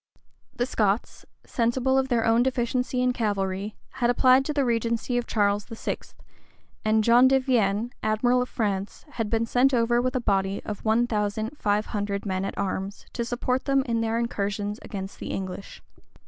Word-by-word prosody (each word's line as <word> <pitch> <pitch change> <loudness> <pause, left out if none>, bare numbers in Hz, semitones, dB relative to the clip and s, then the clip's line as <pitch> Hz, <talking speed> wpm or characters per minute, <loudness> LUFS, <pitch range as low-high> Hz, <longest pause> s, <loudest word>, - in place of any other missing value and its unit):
The 245 - 0
Scots, 210 -3 -1 0.2
sensible 250 +2 +1
of 265 0 +2
their 235 -3 +1
own 230 +1 +4
deficiency 250 0 0
in 250 0 +2
cavalry, 200 -2 -2 0.2
had 240 -1 +2
applied 255 +2 +5
to 300 - -1
the 285 -2 +1
regency 235 +1 0
of 240 - -5
Charles 205 -1 +1
VI.; 225 -2 -4 0.9
and 220 0 +3
John 240 +3 +6
de 265 0 +4
Vienne, 235 -3 +1
admiral 245 +4 +2
of 250 - -3
France, 200 -3 -3
had 225 -5 -3
been 225 +1 +1
sent 250 +3 +3
over 240 0 +2
with 255 +1 -1
a - - +2
body 195 -3 0
of 210 -2 -5
one 225 +2 +3
thousand 215 +2 -2
five 210 -5 0
hundred 205 -1 -3
men 190 -1 -1
at - - -5
arms, 195 0 -3
to 235 - -2
support 250 +2 -1
them 275 -1 +2
in 230 -3 -1
their 225 0 0
incursions 205 -2 -2
against 195 -1 -7
the - - -6
English. 190 +1 -6
230 Hz, 175 wpm, -26 LUFS, 205-250 Hz, 0.9 s, John